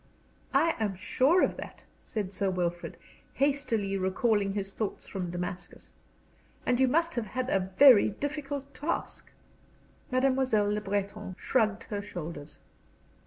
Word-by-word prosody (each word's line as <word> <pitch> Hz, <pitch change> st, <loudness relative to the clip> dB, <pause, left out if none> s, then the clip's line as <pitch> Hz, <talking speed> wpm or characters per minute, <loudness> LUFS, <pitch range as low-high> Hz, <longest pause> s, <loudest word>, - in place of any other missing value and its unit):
"I 330 Hz, 0 st, +4 dB
am 210 Hz, -3 st, -1 dB
sure 265 Hz, -, +3 dB
of -, -, 0 dB
that," -, -, -9 dB, 0.2 s
said 205 Hz, -4 st, -4 dB
Sir 195 Hz, 0 st, 0 dB
Wilfrid, 175 Hz, -2 st, -2 dB, 0.4 s
hastily 250 Hz, -8 st, 0 dB
recalling 195 Hz, +2 st, +1 dB
his 195 Hz, -1 st, -4 dB
thoughts 215 Hz, -3 st, -4 dB
from 185 Hz, -3 st, -4 dB
Damascus. 180 Hz, +1 st, -6 dB, 0.7 s
"And 245 Hz, -, +2 dB
you 265 Hz, -, +5 dB
must 330 Hz, +6 st, +2 dB
have 235 Hz, -3 st, -2 dB
had 255 Hz, +5 st, -3 dB
a 190 Hz, -1 st, 0 dB
very 260 Hz, -9 st, +8 dB
difficult 280 Hz, +3 st, -5 dB
task." 295 Hz, +6 st, -4 dB, 0.8 s
Mademoiselle 255 Hz, -5 st, +2 dB
Le 210 Hz, -, -1 dB
Breton 205 Hz, -1 st, -3 dB
shrugged 220 Hz, -3 st, +1 dB
her 205 Hz, -1 st, -4 dB
shoulders. 160 Hz, -6 st, -7 dB
210 Hz, 130 wpm, -29 LUFS, 195-260 Hz, 0.8 s, very